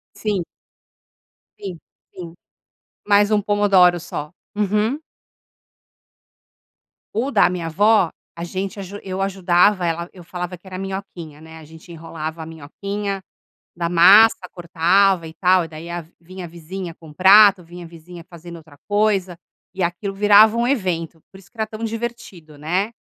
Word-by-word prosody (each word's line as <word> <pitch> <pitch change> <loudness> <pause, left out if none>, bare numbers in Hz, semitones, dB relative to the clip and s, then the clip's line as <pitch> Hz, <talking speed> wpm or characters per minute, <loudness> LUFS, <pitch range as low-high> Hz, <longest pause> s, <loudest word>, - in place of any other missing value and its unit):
Sim. 205 -5 -2 1.2
Sim, 190 -4 -7 0.4
sim. 170 -2 -9 0.7
Mas 205 +1 +4
um 210 - +3
pomodoro 195 -4 +3
só. 150 -2 -7 0.2
Uhum. 210 +6 0 2.2
O 250 +5 -1
da - - +4
minha 175 -2 -4
avó, 205 +1 +3 0.2
a 170 - -7
gente 190 +4 -5
aju 200 +2 -8
eu 190 0 -4
ajudava 185 0 +2
ela, 170 +1 -3
eu 180 -2 -14
falava 180 +1 -6
que 180 - -36
era 185 0 -8
minhoquinha, 190 -6 -7
né. 160 0 -13
A - - -13
gente 160 +3 -15
enrolava 160 -1 -7
a 160 - -7
minhoquinha 195 +6 -6 0.5
da 170 0 -2
massa, 190 +3 +6
cortava 175 +1 +1
e 160 - -11
tal. 180 0 +2
E - - -9
daí 160 +2 -10
a 170 -2 -5 0.2
vinha 185 +1 -9
a - - -8
vizinha 170 +1 -8
com 160 -2 -15
o - - -14
prato, 195 +1 +6
vinha 175 +1 -11
a - - -11
vizinha 170 +1 -13
fazendo 170 0 -11
outra 155 -3 -15
coisa 200 -4 0 0.4
e 190 - -2
aquilo 175 +4 -3
virava 210 +2 +5
um 235 +1 0
evento. 175 - -2
Por 190 - -15
isso 195 - -19
que 235 - -28
era 220 0 -2
tão 215 +1 -8
divertido, 225 -9 -6
né. 180 +8 -2
180 Hz, 160 wpm, -20 LUFS, 170-205 Hz, 2.2 s, massa